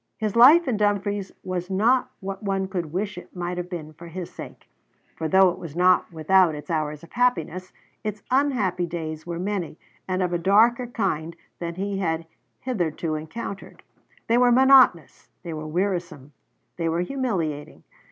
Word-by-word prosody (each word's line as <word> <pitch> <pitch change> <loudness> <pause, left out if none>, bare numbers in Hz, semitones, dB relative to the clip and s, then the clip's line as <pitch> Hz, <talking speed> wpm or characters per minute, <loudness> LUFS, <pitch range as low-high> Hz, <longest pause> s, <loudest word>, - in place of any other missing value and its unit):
His 215 -1 -2
life 290 +8 +7
in 240 -5 0
Dumfries 205 -1 0
was 180 0 -4
not 225 +7 +2
what 195 0 -5
one 195 -2 -1
could 175 -5 -4
wish 190 +1 -3
it - - -16
might 180 0 -3
have 180 0 -5
been 155 -4 -7
for 170 +3 -12
his 175 +1 -7
sake; - - -10 0.5
for 160 - -3
though 190 +2 +5
it - - -9
was 165 -3 -8
not 180 +1 +3
without 170 +1 +3
its 150 +4 -8
hours 150 -1 -2
of 170 - -14
happiness, 185 -7 0 0.3
its 210 -1 -4
unhappy 225 -11 +1
days 160 -1 -6
were 170 -1 -4
many, 185 -3 -3 0.3
and 185 0 0
of 180 -1 -1
a 175 - 0
darker 230 +7 +4
kind 170 -8 -2 0.2
than 170 -1 -4
he 195 +1 -3
had 165 -3 -1 0.4
hitherto 170 - -2
encountered. 160 +6 -7 0.4
They 235 +1 +3
were 250 -1 +5
monotonous, 260 - +5
they 170 -2 -5
were 155 0 -6
wearisome, 170 -5 -3 0.4
they 165 -1 -1
were 165 +2 0
humiliating. 180 - -3
185 Hz, 170 wpm, -24 LUFS, 165-205 Hz, 0.5 s, life